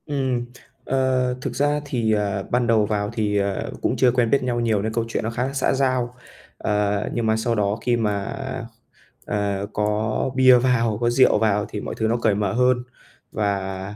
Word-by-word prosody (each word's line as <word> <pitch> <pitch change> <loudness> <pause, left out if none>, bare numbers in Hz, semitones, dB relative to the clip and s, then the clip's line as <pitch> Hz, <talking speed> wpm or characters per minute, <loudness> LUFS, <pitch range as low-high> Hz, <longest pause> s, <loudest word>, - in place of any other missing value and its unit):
Ừm, 130 -4 -1 0.4
ờ, 130 -1 +1
thực - - -4
ra 145 +1 +1
thì, 120 -5 0
ờ, 100 -2 -1
ban 125 -1 +1
đầu 110 -3 +3
vào 105 -1 -1
thì, 105 -3 0
ờ, 100 -1 -1
cũng - - 0
chưa 125 - +4
quen 120 -2 +1
biết 140 +1 +2
nhau 120 -1 -1
nhiều 110 -4 +1
nên 110 +2 -3
câu 115 0 0
chuyện 115 - -3
nó 110 - -1
khá 120 +2 -2
là 135 - -6
xã 135 - +1
giao, 130 -2 0 0.4
ờ, 105 0 0
nhưng 120 -2 -1
mà 110 0 +2
sau 115 +1 0
đó 105 0 0
khi 120 0 +1
mà, 105 -3 -1 1.0
ờ, 100 -1 -1
có 105 +3 0
bia 130 -1 +7
vào, 120 -3 +1
có 120 - +2
rượu 130 0 +4
vào 105 -1 +1
thì 105 - -5
mọi - - -5
thứ 110 - 0
nó 115 +2 +1
cởi 110 -3 +1
mở 100 -2 -1
hơn 125 0 +2 0.5
và, 100 -1 -3
115 Hz, 200 wpm, -22 LUFS, 105-125 Hz, 1.0 s, bia